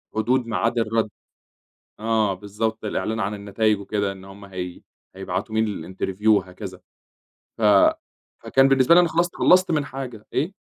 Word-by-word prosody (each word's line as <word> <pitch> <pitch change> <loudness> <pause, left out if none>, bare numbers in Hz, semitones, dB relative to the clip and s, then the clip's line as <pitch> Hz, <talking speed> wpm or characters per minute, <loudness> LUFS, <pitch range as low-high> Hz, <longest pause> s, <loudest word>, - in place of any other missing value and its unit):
حدود 120 +3 +1
ميعاد 115 +1 0
الرد. 115 -1 0 0.9
آه 110 -2 +1
بالضبط 105 +3 -4
الإعلان 110 +1 -2
عن 100 0 -1
النتايج 105 +1 0
وكده 100 0 -2
إن 95 -1 -11
هُم 100 +1 -12
هي 90 -2 -7 0.3
هيبعتوا 95 +3 -4
مين 100 -5 -2
الinterview 95 +3 -3
وهكذا. 95 -2 0 0.8
ف 115 - -6 0.8
فكان 135 0 +3
بالنسبة 135 +4 +5
لي 175 - +8
أنا 175 - +3
خلصت 170 +2 0
خلصت 185 0 +4
من 150 -3 +1
حاجة، 130 -6 -8
إيه؟ 160 +8 -1
110 Hz, 145 wpm, -23 LUFS, 100-125 Hz, 0.9 s, لي